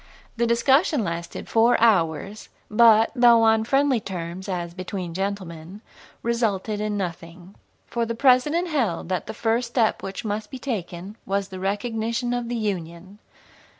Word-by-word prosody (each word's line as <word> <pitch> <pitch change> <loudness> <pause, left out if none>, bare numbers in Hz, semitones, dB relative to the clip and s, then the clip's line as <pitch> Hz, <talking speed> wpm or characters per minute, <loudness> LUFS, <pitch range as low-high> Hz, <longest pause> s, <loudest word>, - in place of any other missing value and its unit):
The 235 0 +1
discussion 265 - +3
lasted 170 -2 -5
four 230 +2 +3
hours, 195 -2 +1 0.2
but, 225 0 +6
though 240 -2 +6
on 220 0 +4
friendly 270 0 +2
terms, 185 -1 -6
as 175 -2 -3
"between 185 -1 -5
gentlemen," 190 -1 -5 0.4
resulted 220 -3 -1
in 210 -1 -2
nothing. 175 0 -6 0.3
For 235 - -2
the 230 - -3
President 280 +8 +3
held 225 - -1
that 185 -1 -2
the - - -6
first 235 +1 0
step 235 -2 +1
which 195 +4 -6
must 210 0 -3
be 265 - -7
taken 200 -5 -5
was 200 0 -1
the 185 -1 -8
recognition 225 +4 -2
of 245 -1 -3
the 240 - -2
Union. 190 -2 -4
210 Hz, 150 wpm, -24 LUFS, 185-235 Hz, 0.4 s, but